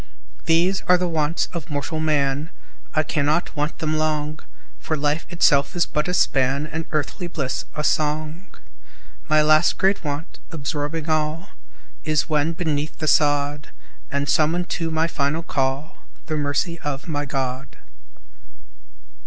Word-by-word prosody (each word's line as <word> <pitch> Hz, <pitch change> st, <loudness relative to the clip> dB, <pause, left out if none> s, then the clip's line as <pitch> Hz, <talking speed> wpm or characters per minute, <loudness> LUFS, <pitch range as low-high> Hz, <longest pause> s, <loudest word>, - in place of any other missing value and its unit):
These 175 Hz, +4 st, +3 dB
are 180 Hz, -, +6 dB
the 180 Hz, 0 st, 0 dB
Wants 160 Hz, -1 st, +1 dB
of 170 Hz, -5 st, -5 dB
mortal 150 Hz, +2 st, -2 dB
Man, 150 Hz, -1 st, +1 dB, 0.5 s
I 155 Hz, -, +3 dB
cannot 155 Hz, +3 st, 0 dB
want 150 Hz, +1 st, -1 dB
them 155 Hz, 0 st, 0 dB
long, 155 Hz, 0 st, -1 dB, 0.4 s
For 155 Hz, -, -2 dB
life 150 Hz, +2 st, 0 dB
itself 165 Hz, -5 st, +3 dB
is 175 Hz, -, +3 dB
but 150 Hz, +2 st, -1 dB
a 180 Hz, -, -1 dB
span, 135 Hz, -2 st, +2 dB
And 160 Hz, +1 st, -4 dB
earthly 155 Hz, +3 st, -2 dB
bliss 140 Hz, -7 st, -3 dB
a 150 Hz, -, -2 dB
song. 155 Hz, +4 st, 0 dB, 0.8 s
My 155 Hz, 0 st, +5 dB
last 155 Hz, +2 st, +4 dB
great 195 Hz, 0 st, +2 dB
Want 150 Hz, +3 st, -5 dB
absorbing 150 Hz, +1 st, -3 dB
all 155 Hz, +3 st, 0 dB, 0.5 s
Is, 155 Hz, -1 st, +1 dB
when 155 Hz, 0 st, +1 dB
beneath 155 Hz, -3 st, -2 dB
the 155 Hz, -, -3 dB
sod, 145 Hz, -1 st, +2 dB, 0.4 s
And 140 Hz, +1 st, -1 dB
summoned 165 Hz, +4 st, +2 dB
to 165 Hz, -1 st, -1 dB
my 160 Hz, 0 st, +1 dB
final 155 Hz, 0 st, -1 dB
call, 135 Hz, 0 st, -2 dB, 0.3 s
The 155 Hz, -, -2 dB
Mercy 150 Hz, +3 st, -1 dB
of 140 Hz, 0 st, -4 dB
my 145 Hz, -3 st, -2 dB
God. 135 Hz, -1 st, -3 dB
155 Hz, 145 wpm, -23 LUFS, 145-165 Hz, 0.8 s, are